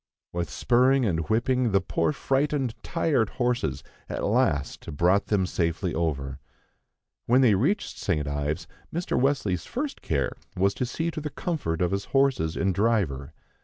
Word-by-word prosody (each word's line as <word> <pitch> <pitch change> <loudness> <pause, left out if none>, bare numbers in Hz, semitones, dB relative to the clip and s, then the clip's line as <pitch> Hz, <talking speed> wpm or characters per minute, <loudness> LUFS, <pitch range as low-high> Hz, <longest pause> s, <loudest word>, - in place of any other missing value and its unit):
With 85 0 -2
spurring 130 +2 +3
and 80 -4 -1
whipping, 120 +1 +2
the 100 - +5
poor - - 0
frightened, 135 -3 0
tired 155 -10 +1
horses 120 - 0 0.3
at - - -3
last 70 0 0
brought 90 +5 +3
them 100 -3 +2
safely 85 0 -1
over. 70 -5 -2 0.9
When 125 +3 +5
they 120 -5 +6
reached 145 - 0
St. 75 -6 0
Ives, 75 +1 -2 0.3
Mr. 170 +2 -2
Wesley's 125 - +1
first 280 +3 -4
care 70 -5 0 0.2
was 100 +2 +3
to 125 - -2
see 165 +7 -2
to 155 - -5
the 150 - -3
comfort 140 - -2
of 90 - +1
his 100 0 -1
horses 135 - +1
and 95 -1 +1
driver. 90 - 0
100 Hz, 155 wpm, -26 LUFS, 80-135 Hz, 0.9 s, they